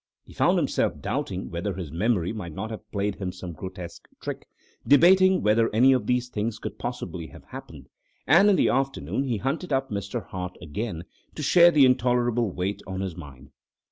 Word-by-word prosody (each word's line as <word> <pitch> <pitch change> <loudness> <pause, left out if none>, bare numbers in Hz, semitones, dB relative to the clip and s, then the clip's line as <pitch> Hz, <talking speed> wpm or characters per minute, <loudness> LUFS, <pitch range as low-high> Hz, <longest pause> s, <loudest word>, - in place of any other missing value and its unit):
He - - -16
found - - +3
himself - - 0
doubting 95 0 -3
whether 90 +3 -3
his 90 -6 -6
memory 90 +1 0
might 85 -7 -6
not 110 +3 -5
have 110 0 -9
played 100 0 -1
him 95 -2 -3
some 90 -1 -8
grotesque 90 0 -9
trick, - - -6 0.4
debating 185 +5 +6
whether 110 +2 +3
any 130 +4 +6
of 130 - -1
these 125 0 +1
things 110 -2 -3
could - - -7
possibly 90 -9 -5
have - - -14
happened; - - -11 0.4
and 175 +8 +6
in 200 - +5
the - - +3
afternoon 135 +1 -1
he 120 -4 -1
hunted 140 - -3
up 135 -1 0
Mr. 100 -1 -4
Hart 90 -1 -6
again 85 +2 -5 0.3
to 150 - -5
share 170 +4 +7
the 150 -5 +5
intolerable 120 -2 +2
weight 95 +2 -3
on 95 0 -4
his 95 -4 -4
mind. 70 -5 -12
110 Hz, 185 wpm, -25 LUFS, 90-130 Hz, 0.4 s, share